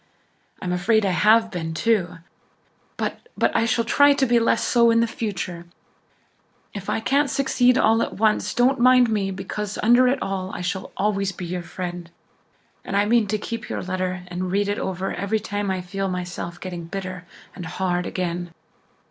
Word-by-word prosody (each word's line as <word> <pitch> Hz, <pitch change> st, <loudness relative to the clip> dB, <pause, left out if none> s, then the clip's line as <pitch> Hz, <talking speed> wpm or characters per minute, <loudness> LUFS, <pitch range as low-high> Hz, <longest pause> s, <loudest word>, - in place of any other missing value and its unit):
I'm 180 Hz, -1 st, -1 dB
afraid 210 Hz, +4 st, +2 dB
I 195 Hz, -, +2 dB
have 220 Hz, +4 st, +4 dB
been, 165 Hz, -4 st, -4 dB
too. 180 Hz, -3 st, +1 dB, 0.8 s
But -, -, -4 dB
but -, -, +1 dB
I 230 Hz, -, +3 dB
shall 230 Hz, +1 st, +1 dB
try 285 Hz, +5 st, +5 dB
to 275 Hz, -, +2 dB
be 240 Hz, -1 st, +3 dB
less 230 Hz, -, +2 dB
so 235 Hz, -1 st, +4 dB
in 230 Hz, 0 st, +4 dB
future. 185 Hz, -7 st, -5 dB, 1.1 s
If 200 Hz, -2 st, -6 dB
I -, -, 0 dB
can't 280 Hz, +5 st, +1 dB
succeed 250 Hz, -1 st, +2 dB
all 225 Hz, -2 st, +4 dB
at -, -, -2 dB
once 215 Hz, +1 st, +1 dB
don't 255 Hz, +2 st, +3 dB
mind 250 Hz, -1 st, +5 dB
me 200 Hz, -3 st, 0 dB
because, 195 Hz, +2 st, -5 dB
under 240 Hz, +3 st, +6 dB
it 265 Hz, +3 st, +1 dB
all, 190 Hz, -1 st, -3 dB
I -, -, -5 dB
shall 185 Hz, +1 st, -3 dB
always 195 Hz, -1 st, 0 dB
be 180 Hz, -1 st, -7 dB
your 180 Hz, +1 st, -3 dB
friend. 175 Hz, 0 st, -6 dB, 0.7 s
And 195 Hz, -, -2 dB
I 205 Hz, -, +3 dB
mean 225 Hz, 0 st, +3 dB
to 215 Hz, +2 st, 0 dB
keep 230 Hz, +2 st, -6 dB
your -, -, -3 dB
letter 185 Hz, 0 st, -3 dB
and 180 Hz, +1 st, -3 dB
read 200 Hz, +1 st, +1 dB
it 205 Hz, -, -1 dB
over 190 Hz, 0 st, -3 dB
every 210 Hz, +2 st, -1 dB
time 205 Hz, -1 st, -3 dB
I 190 Hz, -1 st, -1 dB
feel 195 Hz, +2 st, -3 dB
myself 180 Hz, -1 st, -5 dB
getting 175 Hz, -3 st, -6 dB
bitter 185 Hz, 0 st, -6 dB, 0.3 s
and 180 Hz, -3 st, -7 dB
hard 180 Hz, 0 st, -1 dB
again." 175 Hz, -1 st, -3 dB
195 Hz, 180 wpm, -23 LUFS, 180-230 Hz, 1.1 s, under